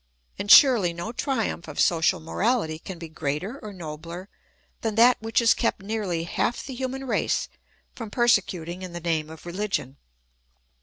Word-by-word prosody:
And 205 - -4
surely 225 - +7
no 175 +6 -5
triumph 235 - -2
of 150 - -7
social 165 -2 +3
morahty 165 -1 -1
can 190 -3 -7
be 165 0 -8
greater 160 - -4
or 215 - -8
nobler 170 +1 -8 0.5
than 220 -2 -2
that 235 +2 +5
which 225 0 -5
has 235 -1 +6
kept 230 -4 -1
nearly 195 -6 -2
half 200 +7 -1
the 270 - -6
human 265 +1 -4
race 255 - 0 0.5
from 230 -4 -7
persecuting 185 -7 +1
in 185 -2 -7
the 175 - -5
name 160 -2 -1
of 160 +1 -12
religion. 175 -7 -3
190 Hz, 160 wpm, -25 LUFS, 165-230 Hz, 0.5 s, surely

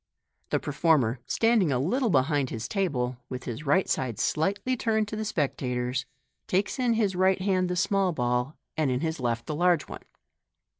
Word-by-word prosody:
The - - +1
per - - -5
former, 140 -6 +2
standing 225 -8 +3
a 130 - +2
little 225 - +1
behind 140 -3 +2
his 115 0 -4
table, 130 -11 -1
with 125 -1 -5
his 120 +5 -6
right 190 +7 +3
side 125 -4 -1
slightly 200 +10 0
turned 220 -2 0
to 215 - -4
the 215 - -3
spectators, 130 - -2 0.4
takes 195 +7 0
in 245 -2 +2
his 210 -4 +1
right 190 +1 +3
hand 185 -1 +1
the 180 - -1
small 195 +1 +2
ball, 125 0 -1 0.2
and 155 -3 +1
in 125 +1 0
his 160 -1 -2
left 120 -2 -1
the 155 - -3
large 175 0 +3
one. - - -8
160 Hz, 185 wpm, -27 LUFS, 130-195 Hz, 0.4 s, standing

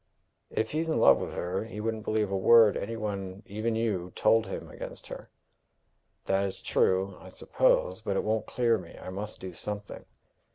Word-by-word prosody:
"If 110 - -2
he's 160 +2 -1
in 160 - +1
love - - +7
with - - -5
her, 90 +4 -2
he 110 -1 -8
wouldn't 110 0 -3
believe 110 -2 0
a - - 0
word 110 +2 +6
any 115 +3 -3
one 100 -2 -4
even 110 +3 -2
you 100 -6 -1
told 115 0 +3
him - - -6
against - - -9
her." - - -8 1.0
"That 95 0 +2
is 95 -1 -3
true, 95 +1 +1
I - - -12
suppose; 95 +4 +1
but 100 -3 -1
it - - 0
won't 110 0 -1
clear 115 -3 +2
me. 85 -2 -12
I 95 - -8
must 105 +3 -6
do 95 -1 -7
something." 105 +3 -5
105 Hz, 190 wpm, -29 LUFS, 95-110 Hz, 1.0 s, love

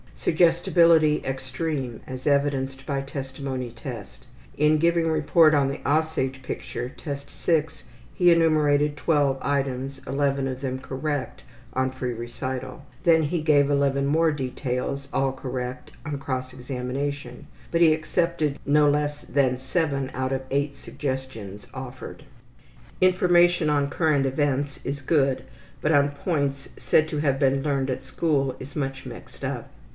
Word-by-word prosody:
Suggestibility 165 - +4
extreme, 130 -1 -3
as 130 +1 -6
evidenced 135 -2 +1
by 140 -2 -1
testimony 135 -2 -5
test. 115 - -9 0.3
In 150 +1 +4
giving 170 +1 +2
report 155 0 +4
on 140 -2 +3
the 140 - -3
``Aussage'' 145 -3 0
picture, 125 -1 -5
Test 140 0 -7
VI, 160 -3 +1 0.5
he 175 -1 +5
enumerated 150 -3 +3
12 145 -3 +2
items, 135 -1 -1
11 140 -1 0
of 130 0 -5
them 130 -2 -2
correct, 140 +1 -4 0.3
on 130 0 +1
free 130 -1 -3
recital. 130 +3 -5 0.2
Then 165 -2 +5
he 155 +2 -1
gave 145 -2 +4
11 140 -1 +2
more 160 +3 +3
details, 135 0 -3
all 135 0 +2
correct, 125 -1 -5
on 145 -2 -3
cross 130 -2 -4
examination, 130 +1 -4 0.2
but 170 - +1
he 160 -2 +7
accepted 155 -2 0
no 150 +1 +4
less 145 0 0
than 130 -3 +1
7 140 0 -1
out 130 0 -2
of 135 -1 -1
8 140 +1 0
suggestions 130 -8 -5
offered. 130 +3 -8 0.8
Information 175 -3 +4
on 145 -1 +1
current 145 -2 +2
events 140 0 0
is 140 +1 -3
good, 135 -3 +2 0.4
but 150 - +1
on 145 -2 +4
points 140 -2 -2
said 155 - +3
to 155 -1 -3
have 140 -3 +1
been 135 -1 +2
learned 140 -2 0
at 130 0 -3
school 135 0 0
is 130 +2 -9
much 135 -2 -3
mixed - - -10
up. - - -4
140 Hz, 140 wpm, -25 LUFS, 130-150 Hz, 0.8 s, he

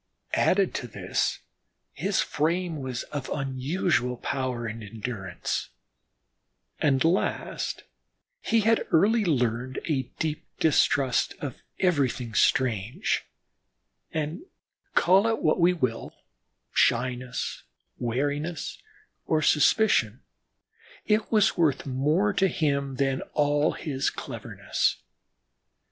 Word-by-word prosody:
Added 195 0 +3
to 120 - -4
this, - - -2 0.5
his - - 0
frame 170 +1 -1
was 130 -2 -4
of 145 -3 -4
unusual 135 -1 0
power 130 -2 -2
and 115 0 -5
endurance, 105 -3 -4 1.1
and 135 -3 +3
last, 170 +4 -1 0.6
he 230 -1 +2
had 225 +2 +2
early 215 +7 +4
learned 125 - 0
a 135 -6 -1
deep 155 -1 -3
distrust 140 -4 +2
of 140 -4 -6 0.2
everything 135 -9 +1
strange, 125 - +1 0.9
and, 155 - -3 0.5
call 190 +5 +5
it 225 0 +1
what 155 - +3
we 175 +1 +5
will, 125 -10 -2 0.6
shyness, 125 +1 0 0.4
wariness 145 +7 -2 0.5
or 155 -1 +2
suspicion, 140 - +3 0.8
it 215 0 +1
was 215 -3 +4
worth 160 -5 +2
more 150 +10 +1
to 195 - +3
him 140 -5 0
than 135 0 0
all 145 +1 +2
his 140 -4 -1
cleverness. - - -2
145 Hz, 100 wpm, -27 LUFS, 125-170 Hz, 1.1 s, call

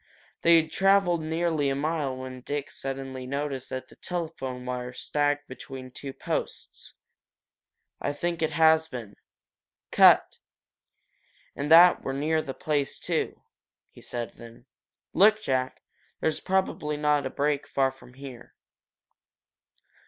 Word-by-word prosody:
They 170 0 +6
had 160 0 -3
traveled 195 -3 +3
nearly 160 -2 0
a 135 - 0
mile 145 -2 -1
when 130 -1 -7
Dick 145 +2 -4
suddenly 135 -1 -5
noticed 140 -1 -3
that 130 0 -5
the - - -19
telephone 145 -8 -5
wire 125 0 -4
sagged 145 +2 -1
between 130 0 -9
two 135 +2 -7
posts, - - -5 1.1
"I 145 - -1
think 170 +3 -3
it 160 - +2
has 160 0 +4
been. 115 -7 -8 0.8
Cut - - +6 1.2
and 145 +1 -3
that 170 +2 +8
we're 135 - -3
near 155 +3 +1
the 135 -3 -6
place, 145 -3 -1
too," - - -2 0.5
he - - -15
said 120 -3 -5
then, 115 +1 -13 0.5
"Look, 215 +2 +5
Jack! 130 -9 -2 0.4
There's 160 - 0
probably 185 -5 -1
a 150 -2 +2
break 145 +1 0
not - - -20
far 135 -1 +1
from 130 -1 -17
here." 135 -3 -11
145 Hz, 130 wpm, -27 LUFS, 130-160 Hz, 1.2 s, that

